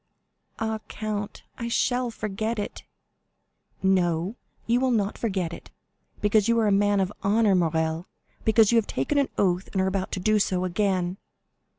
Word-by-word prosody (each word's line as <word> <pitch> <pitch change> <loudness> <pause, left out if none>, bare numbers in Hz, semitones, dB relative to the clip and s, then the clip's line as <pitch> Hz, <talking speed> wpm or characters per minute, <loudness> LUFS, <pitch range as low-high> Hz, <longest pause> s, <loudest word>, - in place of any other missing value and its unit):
"Ah, 220 0 -2
count, 210 -1 -4 0.2
I 235 - -3
shall 245 +1 +1
forget 220 +1 -3
it." 205 - -5 1.0
"No, 180 0 +2 0.3
you 235 +1 +2
will 260 0 +2
not 210 -4 +1
forget 190 -7 -2
it, - - -10 0.5
because 210 0 +3
you 230 0 +3
are 225 - +2
a 205 - +3
man 205 0 +3
of 190 +1 0
honor, 210 +1 +3
Morrel, 160 -1 0 0.4
because 220 -1 +5
you 235 - +4
have 215 - -3
taken 295 - 0
an 280 - +1
oath, 180 -1 +1
and 195 - -1
are 190 - +2
about 190 0 -1
to - - -1
do 215 +3 +2
so 185 -2 +1
again." 185 -1 0
205 Hz, 170 wpm, -26 LUFS, 185-220 Hz, 1.0 s, because